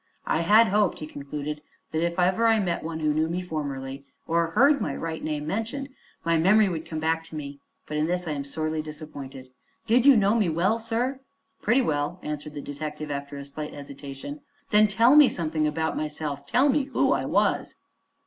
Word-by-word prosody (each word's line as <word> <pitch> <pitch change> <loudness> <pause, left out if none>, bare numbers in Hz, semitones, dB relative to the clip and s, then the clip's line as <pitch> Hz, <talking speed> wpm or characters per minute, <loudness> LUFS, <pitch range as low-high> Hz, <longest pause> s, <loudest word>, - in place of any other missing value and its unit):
"I - - +1
had 215 +6 +6
hoped," 205 -1 +2
he 155 - -6
concluded, 150 0 -6 0.3
"that 160 +1 0
if 170 +1 -1
ever 185 +6 +3
I 225 -1 +4
met 180 -4 -1
one 160 0 -4
who 155 -1 +2
knew 155 +1 +1
me 175 +2 -1
formerly, 140 -6 -5 0.2
or 170 0 +2
heard 275 - +4
my 140 - -2
right 165 -1 -4
name 150 -1 -2
mentioned, 225 - -3 0.4
my 165 -1 +3
memory 205 +5 +5
would 165 -4 -4
come 160 - -5
back 160 +1 0
to 160 - -10
me; 140 -2 -6 0.3
but 150 - -4
in 155 +1 +1
this 180 0 -1
I - - -1
am 140 -2 -3
sorely 155 +2 -2
disappointed. 145 -4 -9 0.3
Did 240 +4 +4
you 275 -4 +8
know 200 0 +3
me 215 -6 +2
well, 185 +8 +1
sir?" 240 +4 -2 0.4
"Pretty 235 +5 +3
well," 150 0 -1
answered 150 0 -5
the 145 - -4
detective, 150 +1 -6
after 140 0 -5
a 140 - -7
slight 150 +2 -7
hesitation. 140 - -8 0.3
"Then 210 0 +6
tell 230 +6 +5
me 300 -3 +8
something 155 -2 -1
about 160 +1 -1
myself. 150 -2 -4
Tell 255 - +3
me 280 0 +2
who 270 - +1
I - - +1
was." - - +1
160 Hz, 200 wpm, -26 LUFS, 150-210 Hz, 0.4 s, you